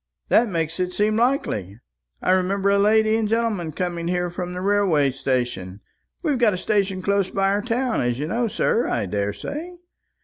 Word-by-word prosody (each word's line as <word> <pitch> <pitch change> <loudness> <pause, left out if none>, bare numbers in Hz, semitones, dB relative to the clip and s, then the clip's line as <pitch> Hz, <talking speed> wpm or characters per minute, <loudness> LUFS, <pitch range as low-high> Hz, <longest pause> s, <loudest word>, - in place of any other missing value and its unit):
That 235 -1 +4
makes 165 -2 -2
it 180 0 -1
seem 210 +2 +1
likely. 225 - 0 0.4
I - - +2
remember 190 +2 +2
a 200 - +3
lady 220 +1 +4
and 220 -1 0
gentleman 220 -7 0
coming 170 +1 -3
here 180 0 -1
from 180 0 -5
the - - -4
railway 190 -8 +2
station 120 -8 -2 0.4
we've 295 -6 +1
got 220 -5 +3
a - - -4
station 195 -1 0
close 200 -1 +1
by 195 0 +1
our 200 +1 +1
town, 245 +2 0
as 120 -1 0
you 145 - -2
know, 230 +8 0
sir, 225 +2 +1
I - - -1
daresay. 105 - -4
195 Hz, 180 wpm, -23 LUFS, 165-220 Hz, 0.4 s, That